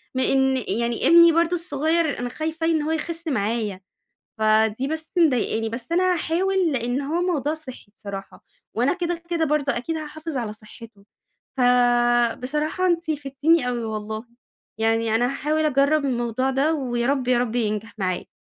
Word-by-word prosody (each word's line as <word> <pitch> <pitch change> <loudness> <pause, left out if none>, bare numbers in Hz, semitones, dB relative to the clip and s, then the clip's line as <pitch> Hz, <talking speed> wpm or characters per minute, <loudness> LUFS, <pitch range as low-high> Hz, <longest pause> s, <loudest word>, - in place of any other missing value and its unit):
من 260 - +1
إن 265 -1 +2
يعني 235 +3 0
ابني 335 0 +8
برضه 335 +1 +2
الصغيّر، 320 -2 0
أنا 245 0 -3
خايفة 315 +4 -3
ي - - +3
إن 315 -2 +1
هو 305 +2 -2
يخِس 330 +1 -4
معايا، 215 -6 -1 0.6
فدي 220 +3 +2
بس 315 +1 -5
مضايقاني 245 -8 +2
بس 230 +7 -6
أنا 365 +1 +3
هاحاول 350 +1 0
لإن 245 +1 -1
هو 315 +5 -1
موضوع 295 +1 -1
صحّي 255 -9 -10
بصراحة، 195 -2 -9 0.3
وأنا 245 +8 +2
كده، 345 -1 -3
كده 335 -2 +1
برضه 290 -2 0
أكيد 285 +7 -3
هاحافظ 310 -1 -6
على 230 -4 -2
صحته، 215 -1 -14 0.5
فبصراحة 245 +6 +2
أنتِ 340 -2 0
فِدتيني 290 0 +1
أوي 240 -2 -2
والله، 220 +1 -5 0.5
يعني 225 0 +1
أنا 240 +2 +2
هاحاول 305 +3 -1
أجرّب 285 +1 +2
الموضوع 240 0 -1
ده 280 +5 +1
ويا 240 -4 -2
رب، 270 -3 0
يا 250 -1 +4
رب 240 -1 -1
ينجح 215 -1 -2
معايا. 185 -2 -2
265 Hz, 160 wpm, -23 LUFS, 235-315 Hz, 0.6 s, ابني